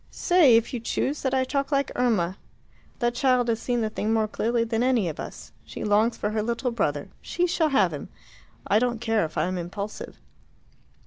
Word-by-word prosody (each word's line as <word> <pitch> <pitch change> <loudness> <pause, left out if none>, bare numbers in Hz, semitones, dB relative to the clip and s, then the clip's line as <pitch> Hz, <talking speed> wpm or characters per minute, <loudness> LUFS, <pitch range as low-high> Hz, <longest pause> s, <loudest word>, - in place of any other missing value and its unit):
"Say, 340 -9 +4
if 230 - -1
you 245 - -2
choose, 275 +5 -2
that 265 -1 0
I 260 - +2
talk 275 +2 -2
like 275 -1 +1
Irma. 205 -7 +1 0.6
That 240 -2 0
child 250 -1 +2
has 225 -1 0
seen 245 -1 0
the 220 - 0
thing 215 0 -2
more 220 -1 +2
clearly 230 +2 0
than 225 0 -1
any 245 -6 +2
of 160 - -5
us. - - -8
She - - -8
longs 215 +3 +2
for 210 - -2
her 215 0 0
little 235 +3 -1
brother. 145 -11 -1
She 355 - -1
shall 330 -2 +1
have 275 -1 +3
him. - - -7 0.6
I 210 - +3
don't 240 -1 0
care 225 -3 +1
if 155 - -8
I - - +2
am 185 0 -2
impulsive." 200 +4 -6
235 Hz, 205 wpm, -25 LUFS, 215-255 Hz, 0.6 s, Say